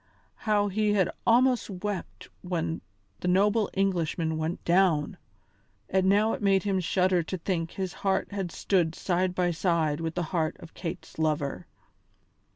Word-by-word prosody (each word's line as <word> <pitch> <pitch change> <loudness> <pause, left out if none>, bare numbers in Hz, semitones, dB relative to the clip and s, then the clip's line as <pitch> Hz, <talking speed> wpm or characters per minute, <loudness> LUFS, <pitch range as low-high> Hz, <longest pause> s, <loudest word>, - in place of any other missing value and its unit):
How 205 -1 +3
he 210 +1 +1
had 190 -4 +2 0.2
almost 245 +1 +4
wept 195 0 -5
when 165 -2 -2 0.4
the - - -3
noble 205 +4 +3
Englishman 170 -4 0
went 160 +2 -3
down! 170 -4 +3 0.8
And 190 0 +3
now 210 +3 +4
it - - -4
made 195 -1 +3
him 195 -2 +1
shudder 185 0 +2
to 175 +3 -4
think 165 -2 -2
his 190 -2 -3
heart 195 0 0
had 195 -4 -3
stood 170 -4 +1
side 180 0 0
by 180 -1 +1
side 160 -3 0
with 165 0 -3
the 175 - 0
heart 160 -3 0
of 160 - -12
Kate's 175 -1 -7
lover! 150 -3 -1
180 Hz, 155 wpm, -28 LUFS, 165-195 Hz, 0.8 s, almost